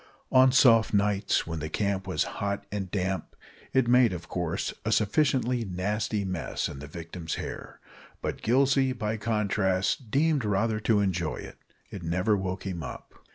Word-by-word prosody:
On 130 0 +6
soft 115 -5 +5
nights, 100 0 +1
when 80 -1 -4
the 75 +1 -4
camp 100 +2 -1
was - - +1 0.2
hot 100 0 -2
and 100 -3 -3
damp, 95 0 -2 0.4
it 130 -2 +2
made, 125 -3 +5
of 85 -1 -7
course, 85 -3 -2
a - - -1
sufficiently 125 +1 +2
nasty 100 +2 -2
mess 90 -4 -2
in 70 - -8
the 75 - -8
victim's 85 +1 -6
hair, - - -7 0.4
but - - -4
Gillsey, 135 +2 +3
by 110 -3 -2
contrast, 105 0 0
deemed 145 +1 +2
rather 105 +2 +1
to 105 -1 +2
enjoy 90 -5 -1
it. - - -10 0.3
It 100 - -7
never 90 +5 +1
woke 95 -1 -3
him 90 -3 -4
up. 70 - -8
100 Hz, 160 wpm, -28 LUFS, 95-115 Hz, 0.4 s, On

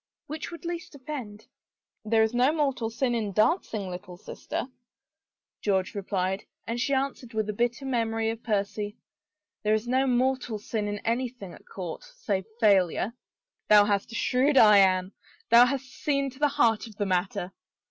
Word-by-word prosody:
Which 310 0 -6
would 340 0 -10
least 340 -3 -5
offend? 255 -7 -7 0.6
"There 220 +1 +3
is 220 +1 0
no 250 +4 +4
mortal 275 -7 0
sin 245 +2 -1
in 215 -4 -2
dancing, 215 - +1
little 180 0 -8
sister," - - -5 1.0
George 190 -2 0
replied, 195 -1 -2 0.2
and 235 +1 -3
she 280 +1 +1
answered 265 -3 -3
with 215 -1 0
a - - -1
bitter 240 +5 -1
memory 225 -3 0
of 225 0 -7
Percy, 205 0 -2 0.3
" 305 0 -63
There 215 0 +3
is 220 +2 -3
no 260 +2 +2
mortal 250 -2 +1
sin 210 0 -3
in 205 0 -3
anything 235 -5 -2
at - - -16
court 185 - -6
— - - -30
save 190 -3 0
failure." 200 -1 +3 0.3
" - - -56
Thou 210 -1 +8
hast 205 +1 0
a - - -7
shrewd 270 +4 +2
eye, 210 -3 +8
Anne; 185 -1 +3 0.4
thou 240 +1 +8
hast 270 0 -2
seen 275 0 -1
to 260 - -17
the 295 - +4
heart 225 0 +3
of 215 - -13
the 205 - -1
matter." 185 0 -1
225 Hz, 180 wpm, -27 LUFS, 205-260 Hz, 1.0 s, Thou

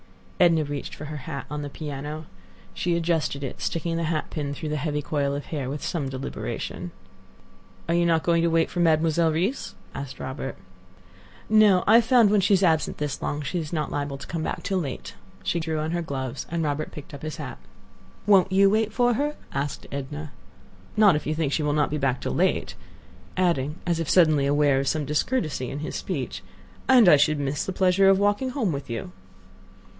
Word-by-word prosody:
Edna 165 -3 +5
reached 145 -1 -5
for 150 - -8
her 150 0 -6
hat 140 0 -6
on 150 0 -3
the 145 - -5
piano. 150 +1 -6 0.5
She 175 -1 0
adjusted 165 -4 0
it, 135 - -6
sticking 165 0 -1
the 165 - -1
hat 155 -1 -2
pin 145 -2 -3
through 155 - -5
the 150 - -1
heavy 150 0 -2
coil 140 -2 -1
of 145 - -5
hair 140 -5 -4
with 145 +2 -5
some 150 -7 -2
deliberation. 135 +1 -5 1.0
"Are 170 - +1
you 170 0 +3
not 165 -1 +2
going 170 -1 +3
to 170 - +2
wait 165 0 +2
for 175 - -3
Mademoiselle 160 0 +3
Reisz?" 185 - -2 0.2
asked 140 -2 -7
Robert. 130 +1 -5 0.9
"No; 210 -4 +5
I 220 +2 +7
have 235 - +3
found 240 -4 +5
when 210 -1 +4
she 200 +1 +4
is 190 - +1
absent 160 -3 +2
this 145 -2 -3
long, 145 0 -2
she 175 +5 -2
is 155 -2 -5
liable 145 -3 -2
not - - -16
to - - -6
come 165 -2 -4
back - - -3
till 190 -2 0
late." 140 -7 -5 0.3
She 170 - 0
drew 160 -1 -2
on 155 +1 -2
her 175 0 -1
gloves, 135 -6 -4
and 170 -1 -1
Robert 150 0 -2
picked 150 - -10
up 140 - -8
his 155 0 -5
hat. - - -7 0.7
"Won't 195 -2 +5
you 195 +1 +5
wait 220 0 +1
for 245 0 +2
her?" 295 +5 -1 0.2
asked 140 +1 -3
Edna. 145 +2 -5 0.7
"Not 205 -5 +6
if 150 - -3
you 155 - 0
think 155 -3 -1
she - - +1
will 150 -1 +1
not 150 -1 +1
be 150 - -1
back 130 -2 +1
till - - -3
late," - - +1 0.6
adding, 160 -6 +1
as 170 -2 0
if 165 - -2
suddenly 155 -6 +4
aware 145 -1 +3
of 135 - -2
some 155 0 0
discourtesy 150 - -1
in 140 +1 -5
his 155 - -5
speech, - - -4 0.5
"and 250 -6 +7
I 150 - +8
should 150 +1 +3
miss 140 0 -1
the - - -3
pleasure 190 +1 +4
of 195 - +5
walking 205 +6 +1
home 245 -8 0
with 140 -3 -5
you." 115 +11 -4
155 Hz, 210 wpm, -25 LUFS, 145-180 Hz, 1.0 s, I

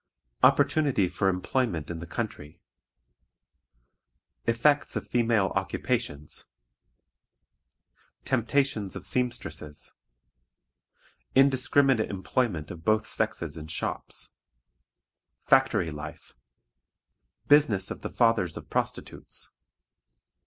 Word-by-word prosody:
Opportunity 140 -5 +4
for 95 +2 +1
Employment 90 - -1
in 85 - -5
the 85 - -7
Country. 85 -8 -5 1.9
Effects 140 +6 +2
of - - -3
Female 115 -5 +2
Occupations. 70 +1 -2 1.8
Temptations 120 -5 +1
of - - -7
Seamstresses. 120 -12 -3 1.4
Indiscriminate 135 -2 +4
Employment 95 -4 -1
of 85 -2 -9
both 110 +3 +2
Sexes - - -2
in 80 0 -7
Shops. 80 - -3 1.1
Factory 80 - +3
Life. 75 +1 -9 1.1
Business 120 -11 +4
of - - -6
the - - -4
Fathers 115 -8 +2
of - - -10
Prostitutes. - - -3
110 Hz, 80 wpm, -28 LUFS, 85-130 Hz, 1.9 s, Opportunity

